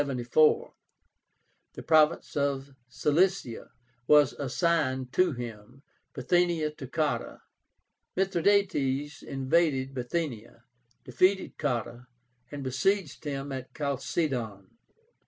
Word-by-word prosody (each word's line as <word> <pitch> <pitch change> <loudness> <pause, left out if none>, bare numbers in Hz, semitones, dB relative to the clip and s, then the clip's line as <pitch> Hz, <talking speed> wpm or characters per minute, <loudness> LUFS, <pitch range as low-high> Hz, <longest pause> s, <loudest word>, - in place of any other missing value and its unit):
The 140 +2 +2 1.1
province 155 -1 +3
of 140 -1 -1 0.2
Cilicia 155 -1 0 0.4
was 150 -2 +6
assigned 135 -3 -1
to 180 -3 +3
him, 120 +1 -9 0.3
Bithynia 165 +2 +1
to 140 -3 -9
Cotta. 150 +3 -2 0.7
Mithradátes 170 -7 +1
invaded 135 -1 0
Bithynia, 125 -4 -4 0.4
defeated 185 +10 +1
Cotta, 120 -3 -3 0.4
and 145 -1 -6
besieged 150 +7 -1
him 140 -1 -4
at 130 -1 -6
Chalcédon. 130 - -2
140 Hz, 80 wpm, -28 LUFS, 130-160 Hz, 1.1 s, was